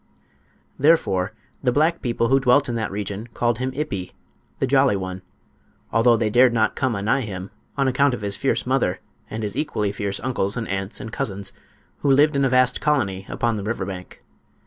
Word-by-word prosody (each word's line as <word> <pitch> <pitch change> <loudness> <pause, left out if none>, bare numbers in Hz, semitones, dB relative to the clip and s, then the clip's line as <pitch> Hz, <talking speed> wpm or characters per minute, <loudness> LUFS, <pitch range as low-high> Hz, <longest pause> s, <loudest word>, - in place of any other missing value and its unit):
Therefore 110 - +3 0.3
the 125 - +2
black 160 +6 +2
people 115 -2 0
who 135 +1 +5
dwelt 135 +2 +4
in 120 - -2
that 110 -2 -2
region 105 +2 -4
called 120 -1 +1
him 130 +1 -1
"Ippi"—the 130 -3 -5
jolly 135 -3 +4
one, 95 -1 -4 0.7
although 115 +1 +5
they 110 -2 0
dared 125 +1 +5
not 110 -2 +1
come 130 -4 0
anigh 105 +7 +1
him 95 -4 -6 0.3
on 135 -1 +2
account 130 0 +3
of 120 - -9
his 100 -1 -1
fierce - - 0
mother, - - +1 0.3
and 110 0 -4
his 105 0 -4
equally 115 -8 -1
fierce 100 -1 -2
uncles 115 -5 -1
and 115 - -3
aunts 95 +1 -3
and 115 -4 -7
cousins, 100 -1 -4 0.5
who 145 - 0
lived 145 +2 +5
in 140 - +2
a 135 - +3
vast 125 0 +3
colony 100 -11 0
upon 115 -2 0
the 100 - -4
river 105 -2 -2
bank. 90 -1 -8
115 Hz, 190 wpm, -23 LUFS, 100-130 Hz, 0.7 s, who